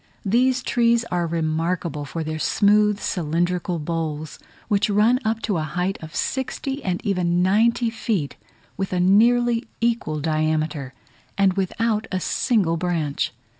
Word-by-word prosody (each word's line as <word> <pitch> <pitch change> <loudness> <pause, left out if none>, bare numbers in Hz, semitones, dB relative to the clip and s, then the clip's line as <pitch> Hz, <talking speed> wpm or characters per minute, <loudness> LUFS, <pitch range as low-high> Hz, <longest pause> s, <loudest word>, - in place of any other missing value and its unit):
These 250 +5 +2
trees 235 -1 +2
are 175 -1 0
remarkable 165 -1 -2
for 160 +3 -4
their 155 0 -4
smooth 210 +3 +3
cylindrical 175 +1 -1
boles, 155 -1 -4 0.3
which 205 -1 +1
run 215 +5 +3
up 220 +1 -1
to 200 -5 0
a - - -1
height 180 +5 -2
of 160 0 -9
sixty, 265 +1 -3
and 180 -2 -2
even 180 -3 +1
ninety 225 +4 +2
feet, 205 -10 -2 0.4
with 190 0 -3
a 180 - +1
nearly 235 +5 +3
equal 230 -10 0
diameter, 155 -3 -1 0.4
and 195 -1 +4
without 215 +3 -1
a 185 - 0
single 185 -4 +1
branch. 165 -5 -1
185 Hz, 135 wpm, -23 LUFS, 160-220 Hz, 0.4 s, and